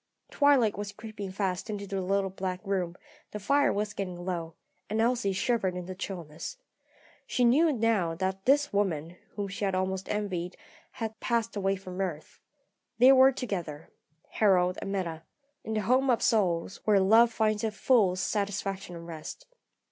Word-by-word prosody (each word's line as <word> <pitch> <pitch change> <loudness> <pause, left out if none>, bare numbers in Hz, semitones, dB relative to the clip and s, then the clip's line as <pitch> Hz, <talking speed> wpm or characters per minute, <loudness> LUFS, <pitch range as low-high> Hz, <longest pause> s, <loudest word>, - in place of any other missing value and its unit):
Twilight 280 -7 +4
was 205 -1 -4
creeping 215 -1 -7
fast 190 +1 -2
into 205 -1 -4
the 195 -1 -3
little 195 +1 0
back 185 -1 -3
room; 185 -3 -1 0.3
the 210 - -6
fire 285 +8 +3
was 205 0 -2
getting 180 -3 -5
low, 170 -3 -4 0.3
and 215 +2 -1
Elsie 235 -2 +2
shivered 195 -2 0
in 180 -1 -5
the 185 - -6
chillness. 180 - -6 0.7
She 250 - +2
knew 305 +7 +5
now 220 - +1
that 190 +2 -3
this 285 -1 +3
woman, 175 -4 -1 0.2
whom 205 -1 -3
she 195 +1 -6
had 195 -2 +1
almost 190 0 -2
envied, 185 -4 -3 0.4
had 225 -1 -5
passed 230 -2 -1
away 195 -1 +1
from 185 -1 -6
earth. 170 -5 -5 0.6
They 255 +2 +8
were 265 0 +7
together 175 - -5 0.4
Harold 185 -3 +3
and 195 - -4
Meta 170 -5 -3 0.4
in 220 - -4
the 215 - +1
home 255 +6 +2
of 240 - +2
souls, 185 -4 +1
where 210 -2 +4
love 225 +5 +5
finds 215 -1 0
its 215 -2 -2
full 215 -8 +3
satisfaction 195 -1 -2
and 170 0 -9
rest. 160 -2 -8
200 Hz, 165 wpm, -29 LUFS, 185-220 Hz, 0.7 s, They